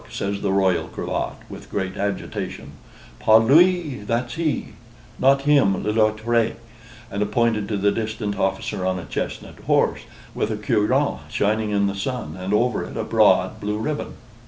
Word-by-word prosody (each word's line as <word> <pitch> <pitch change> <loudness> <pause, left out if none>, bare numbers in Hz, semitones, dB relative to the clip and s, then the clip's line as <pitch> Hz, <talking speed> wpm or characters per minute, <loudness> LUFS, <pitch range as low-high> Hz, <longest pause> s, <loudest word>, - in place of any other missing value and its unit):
says 100 0 -3
the - - 0
Royal 95 -2 +2
Cravat, - - -3
with - - -11
great 95 -1 -3
agitation, 100 -4 -4 0.5
"pas 110 0 +6
lui, 160 +4 +4
that's 115 +3 -2
he; 160 -2 -1 0.5
not 135 +1 +4
him, 140 -10 +3
l'autre," 110 +2 +1 0.6
and 105 +1 -2
pointed 115 -4 +1
to 105 - -2
the 100 +1 +2
distant 110 -1 -3
officer 95 -1 -1
on 95 0 0
a 90 - -6
chestnut - - -5
horse, - - +2 0.3
with - - -1
a 110 - -2
cuirass 105 0 +1
shining 110 +1 0
in 100 -1 +1
the 100 - 0
sun, 120 +5 -4
and 95 +1 -5
over 120 +3 +1
it - - -8
a - - -1
broad - - +3
blue 105 +1 -2
ribbon. 145 +7 -3
105 Hz, 160 wpm, -22 LUFS, 100-120 Hz, 0.6 s, pas